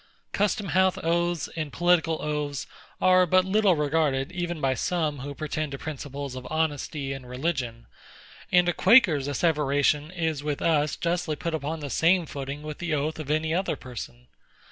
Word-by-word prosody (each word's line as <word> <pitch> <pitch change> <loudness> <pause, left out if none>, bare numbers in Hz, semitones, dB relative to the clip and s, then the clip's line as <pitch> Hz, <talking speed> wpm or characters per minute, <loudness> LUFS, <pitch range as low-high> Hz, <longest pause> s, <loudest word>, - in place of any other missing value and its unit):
Custom 205 -1 0
house 185 +1 +3
oaths 170 -1 0
and 155 -3 -3
political 165 -1 +2
oaths 150 -2 -2 0.3
are 185 0 +5
but 185 +2 +4
little 200 -1 +3
regarded 150 -2 0
even 175 -2 -3
by 135 -2 +1
some 155 0 -1
who 140 +2 -6
pretend 155 0 -3
to - - -4
principles 140 -2 -6
of 130 0 -7
honesty 150 -3 -2
and 130 -2 -9
religion; 125 -4 -3 0.7
and 180 0 +5
a 175 - +2
Quaker's 180 - +5
asseveration 145 0 +1
is 160 -5 -2
with 150 -1 -2
us 150 -2 +2
justly 170 -2 -1
put 170 +1 -4
upon 155 +1 -3
the 145 - -5
same 175 +1 +3
footing 140 0 -6
with 150 -1 -7
the 170 -3 -1
oath 150 +2 -2
of 150 -2 -6
any 155 +1 +1
other 190 +3 0
person. 125 -1 -9
155 Hz, 165 wpm, -26 LUFS, 140-175 Hz, 0.7 s, are